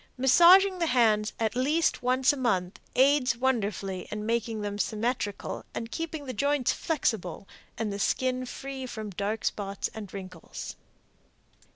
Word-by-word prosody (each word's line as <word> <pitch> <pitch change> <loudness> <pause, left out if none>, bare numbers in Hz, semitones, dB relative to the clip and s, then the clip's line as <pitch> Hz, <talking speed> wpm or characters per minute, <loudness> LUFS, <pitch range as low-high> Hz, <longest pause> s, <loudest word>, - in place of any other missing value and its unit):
Massaging 360 +8 +6
the 335 - +1
hands 220 -5 +3
at 225 0 0
least 300 +6 +1
once 255 +2 +3
a - - -3
month 190 -9 -1 0.2
aids 260 -2 +4
wonderfully 205 -7 -1
in 210 0 -4
making 225 -1 -1
them 205 0 -4
symmetrical 215 -1 -2
and 230 0 -4
keeping 320 -3 -4
the 255 - -4
joints 280 +1 +1
flexible 215 - -2 0.3
and 215 -3 -2
the 200 - -5
skin 255 +4 0
free 265 0 -6
from 215 -4 -6
dark 205 +4 -3
spots 200 -1 -2
and 210 -4 -8
wrinkles. 185 -4 -8
235 Hz, 145 wpm, -28 LUFS, 205-265 Hz, 0.3 s, Massaging